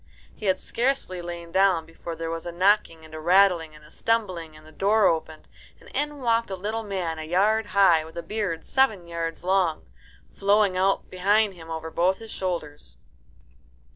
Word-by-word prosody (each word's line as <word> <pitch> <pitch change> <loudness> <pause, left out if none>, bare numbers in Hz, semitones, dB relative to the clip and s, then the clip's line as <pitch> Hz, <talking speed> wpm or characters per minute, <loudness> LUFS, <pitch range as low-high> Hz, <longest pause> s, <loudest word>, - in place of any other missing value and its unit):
He 210 - -5
had 185 -1 +2
scarcely 235 -8 -1
lain 170 -1 -7
down 190 -3 +3
before 165 +1 -8
there 165 0 -4
were 165 0 -4
a 175 - -5
knocking 180 -3 +1
and 155 - -15
a 155 - -6
rattling 175 -2 +3
and 150 0 -16
a 150 - -18
stumbling, 185 -9 -1
and 155 - -17
the 155 - -15
door 205 +4 +2
opened, 160 -1 -1 0.3
and - - -16
in 295 0 -2
walked 230 -2 +1
a 190 - -3
little 215 +4 -3
man 185 -6 -3
a - - -4
yard 205 +7 +2
high, 185 -5 +4
with 160 +1 -12
a 170 - -4
beard 200 -7 -3
seven 220 -10 +2
yards 170 -1 -4
long 180 - +1 0.5
flowing 200 -1 +2
out 195 +1 +1
behind 200 +3 +2
him 165 -2 -13
over 160 0 -5
both 185 +3 +2
his 225 -1 -11
shoulders. 170 -6 -5
185 Hz, 185 wpm, -25 LUFS, 165-205 Hz, 0.5 s, high